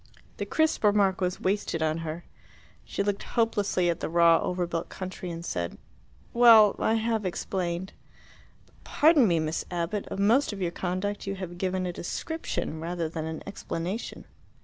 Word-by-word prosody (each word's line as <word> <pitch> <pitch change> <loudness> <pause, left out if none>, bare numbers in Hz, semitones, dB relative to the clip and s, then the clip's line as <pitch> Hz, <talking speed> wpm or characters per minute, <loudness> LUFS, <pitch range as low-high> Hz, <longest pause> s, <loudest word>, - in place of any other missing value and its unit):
The - - -4
crisp 315 -5 +1
remark 200 -2 +3
was 180 0 -1
wasted 190 -4 -1
on 155 +1 0
her. 165 +1 -5 0.6
She - - -2
looked 200 0 -1
hopelessly 205 -6 0
at 170 - 0
the - - -3
raw 170 0 +5
over 180 -1 -1
built 170 -1 -4
country, 185 -1 -6
and 170 0 -6
said, 85 - -3 0.6
"Well, 230 -3 +7
I 220 - +2
have 225 -1 0
explained." 185 0 -3 0.7
"But - - -28
pardon 300 -5 +4
me, 170 -3 +2
Miss 155 +1 -2
Abbott; 175 +4 -2
of - - -5
most 225 +6 +3
of 200 - -7
your 175 -3 -1
conduct 190 +4 -3
you 195 - -2
have 175 -2 -7
given 185 0 -1
a 175 - -3
description 180 - -4
rather 170 0 -3
than 160 -1 -4
an 160 0 -5
explanation." 195 +1 -5
185 Hz, 170 wpm, -27 LUFS, 170-205 Hz, 0.7 s, Well